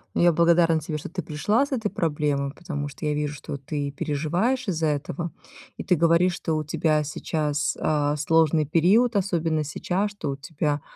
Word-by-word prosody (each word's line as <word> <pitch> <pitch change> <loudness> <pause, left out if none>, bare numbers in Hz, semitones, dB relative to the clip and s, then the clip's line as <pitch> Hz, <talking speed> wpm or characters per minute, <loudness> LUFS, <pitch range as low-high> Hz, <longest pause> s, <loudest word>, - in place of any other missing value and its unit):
Ну, - - +2
я 175 0 +6
благодарна 170 0 +4
тебе, 155 0 -4
что - - -7
ты 180 -1 -4
пришла 205 - +1
с 285 - -14
этой 225 -5 -1
проблемой. 150 -7 -1
Потому 150 -5 -4
что, 145 +2 -8
я 150 - +1
вижу, 150 0 -2
что 140 0 -6
ты 140 +1 -4
переживаешь 175 - -1
из-за 165 -4 0
этого. 150 +3 -2 0.5
И - - -5
ты 180 - +3
говоришь, 170 +2 +3
что 160 -3 -2
у 155 - -1
тебя 155 0 +1
сейчас, 150 -1 -1
а, 150 -1 +1
сложный 155 0 +3
период, 200 - +3
особенно 165 -5 0
сейчас, 185 +7 -2
что 205 -8 -5
у - - -3
тебя, 145 0 -2
155 Hz, 185 wpm, -25 LUFS, 150-175 Hz, 0.5 s, я